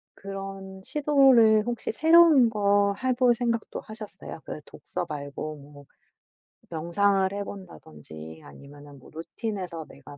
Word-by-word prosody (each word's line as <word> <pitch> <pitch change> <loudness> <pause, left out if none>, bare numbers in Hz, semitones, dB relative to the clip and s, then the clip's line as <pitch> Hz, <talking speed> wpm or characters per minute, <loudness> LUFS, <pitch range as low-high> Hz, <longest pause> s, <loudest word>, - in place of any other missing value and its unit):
그런 195 -1 -8
시도를 265 -7 +4
혹시 240 -1 -3
새로운 320 -3 +6
거 200 -1 +2
해 260 - +2
볼 245 -1 +4
생각도 230 -1 -2
하셨어요? 210 -6 -10
그 - - -6
독서 - - -6
말고 150 +1 -6
뭐 145 0 -15 0.8
명상을 190 +4 +1
해 200 0 -3
본다든지 80 - -11
아니면은 140 - -14
뭐 - - -17
루틴에서 170 0 -6
내가 140 +1 -14
195 Hz, 265 characters per minute, -26 LUFS, 150-225 Hz, 0.8 s, 새로운